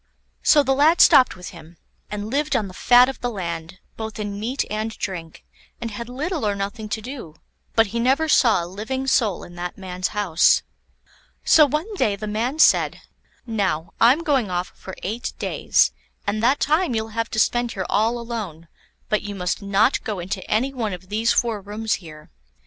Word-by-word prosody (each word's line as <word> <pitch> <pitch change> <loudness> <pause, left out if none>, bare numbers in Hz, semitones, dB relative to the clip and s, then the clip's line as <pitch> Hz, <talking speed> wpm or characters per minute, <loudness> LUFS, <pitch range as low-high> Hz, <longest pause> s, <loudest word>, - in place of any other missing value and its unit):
So 295 -2 +5
the 270 0 +2
lad 305 +5 +4
stopped 255 - +6
with 180 0 -9
him, 170 -1 -14 0.3
and 210 +1 -5
lived 295 +3 0
on 210 - 0
the 185 - -10
fat 245 +6 +6
of 270 - -5
the 245 - -1
land, 170 -4 -5 0.2
both 220 0 -6
in 205 -1 -4
meat 245 +6 -2
and 215 +1 -2
drink, 170 -5 -6 0.3
and 230 -1 -5
had 235 +3 -7
little 305 +5 -3
or 205 -1 +1
nothing 205 +2 -5
to 220 - -3
do; 240 - -8 0.4
but 225 - +5
he 235 - -1
never 270 +6 +2
saw 230 - +4
a - - -5
living 220 +9 -4
soul 225 -8 +1
in 175 - -12
that 175 0 -5
man's 185 -1 -3
house. 195 -6 +3 0.8
So 305 -2 +6
one 310 - -2
day 205 - +1
the 215 +2 -6
man 225 +7 -2
said: 320 - +4 0.4
"Now, 190 -8 -1
I'm 255 +8 +5
going 270 - +1
off 180 0 -2
for 190 - -10
eight 230 +6 -3
days, - - +2 0.3
and 210 +1 -1
that 255 +5 +3
time 310 -3 +1
you'll 220 0 -2
have 230 +1 -3
to 220 - -5
spend 240 +2 +1
here 190 -2 -3
all 225 +3 +1
alone; 215 -9 -6 0.4
but 215 - +1
you 205 -1 -6
must 180 0 -2
not 200 +5 +2
go 215 -3 -3
into 185 +1 -4
any 255 +6 +1
one 225 -6 -2
of 180 +1 -9
these 220 +3 +1
four 230 -4 0
rooms 210 +2 -3
here. 155 -3 -13
220 Hz, 195 wpm, -22 LUFS, 190-245 Hz, 0.8 s, stopped